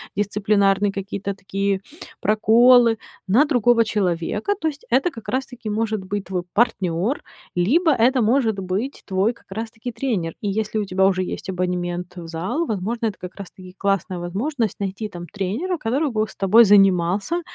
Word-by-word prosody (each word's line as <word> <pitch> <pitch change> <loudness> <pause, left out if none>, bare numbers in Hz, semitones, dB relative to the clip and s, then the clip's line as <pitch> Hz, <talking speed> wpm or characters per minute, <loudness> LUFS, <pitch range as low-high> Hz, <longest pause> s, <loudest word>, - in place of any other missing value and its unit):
дисциплинарные 200 0 +2
какие-то 200 0 -4
такие 195 0 -2 0.4
проколы 230 +2 +5 0.3
на 235 +11 +5
другого 240 -5 +3
человека. 205 - -1
То 320 - 0
есть 300 -1 -5
это 265 +8 +3
как 225 - -11
раз-таки 250 -3 -3
может 215 -1 -1
быть 200 +1 -4
твой 180 -1 -3
партнёр, 200 - 0 0.3
либо 305 - +3
это 255 +1 +3
может 225 -2 +2
быть 195 +9 -3
твой 195 +4 +1
как - - -25
раз-таки 225 +3 -5
тренер. 220 -9 -2
И 205 - -1
если 215 +2 -2
у 205 - -1
тебя 190 0 +2
уже 185 -1 +2
есть 185 - -6
абонемент, 180 0 -3
э, - - -6
в 165 - -9
зал, 180 - -2
возможно, 225 - -2
это 205 - -4
как 180 - -8
раз-таки 185 -2 -11
классная 195 -2 -1
возможность 215 - -2
найти 200 +2 -3
там 175 -3 -8
тренера, 210 - -2
который 280 +3 0
бы 215 -1 0
с - - -14
тобой 215 +4 +6
занимался. 195 - +3
205 Hz, 165 wpm, -22 LUFS, 190-235 Hz, 0.4 s, тобой